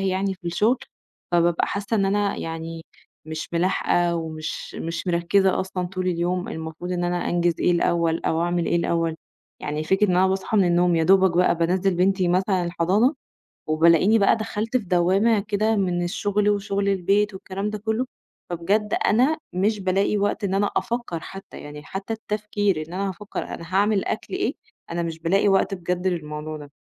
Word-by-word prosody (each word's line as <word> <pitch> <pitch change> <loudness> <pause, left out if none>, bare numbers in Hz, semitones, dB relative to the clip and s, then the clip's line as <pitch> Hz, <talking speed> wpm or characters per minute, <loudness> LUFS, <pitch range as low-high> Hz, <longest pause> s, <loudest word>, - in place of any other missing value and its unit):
يعني 190 0 0
في 180 -2 -12
الشُغل، 215 +9 +2 0.5
فبابقى 170 0 +3
حاسّة 200 +2 -2
إن 195 - +2
أنا 200 +1 +1
يعني 165 0 -5 0.4
مش 155 0 -5
ملاحقة 175 0 +1
ومش 160 -1 -5
مش 165 +3 -4
مركّزة 180 +2 +2
أصلًا 185 -1 -3
طول 185 0 -4
اليوم 180 +1 -1
المفروض 160 +3 -5
إن 175 0 -1
أنا 175 0 -1
أنجِز 175 -1 +1
إيه - - +3
الأول 170 -1 +1
أو 160 +1 +1
أعمل 175 0 0
إيه 170 - +2
الأول. 165 -1 0 0.5
يعني 150 +1 -3
فكرة 190 +5 +3
إن 180 - +2
أنا 185 +1 +5
باصحى 190 +3 -1
من 195 - +5
النوم، 175 0 +3
يا 165 - +2
دوبك 190 -1 +4
بقى 180 - +4
بانزِّل 180 +3 +1
بنتي 185 +1 +2
مثلًا 185 +1 +1
الحضان 185 - +2 0.6
وبالاقيني 165 +7 +4
بقى 200 - +4
دخلْت 220 +2 -2
في 240 - -5
دوّامة 190 +5 +3
كده 215 +2 0
من 180 -3 0
الشُغل 205 +3 0
وشُغل 200 -1 0
البيت 200 +2 +2
والكلام 195 +2 -4
ده 215 - -4
كُلّه، 220 +4 -1 0.4
فبجد 200 +5 0
أنا 260 +9 +3 0.2
مش 205 +4 +1
بالاقي 195 +2 +1
وقت 205 +1 -1
إن 195 -1 0
أنا 200 +1 +2
أفكَّر 235 -8 -2
حتّى، 195 +4 -10
يعني 150 0 -9
حتّى 195 +7 -5
التفكير 210 -3 -1
إن 170 - -10
أنا 195 +1 -1
أفكَّر 200 +3 -6
أنا - - -7
هاعمل 205 0 +2
أكل 220 - -4
إيه، 385 +2 0 0.4
أنا 170 0 -1
مش 165 -1 -5
بألاقي 190 +5 +2
وقت 195 0 +3
بجد 180 0 -2
للموضوع 155 -3 -3
ده. 145 -1 -11
185 Hz, 175 wpm, -23 LUFS, 170-200 Hz, 0.6 s, أنا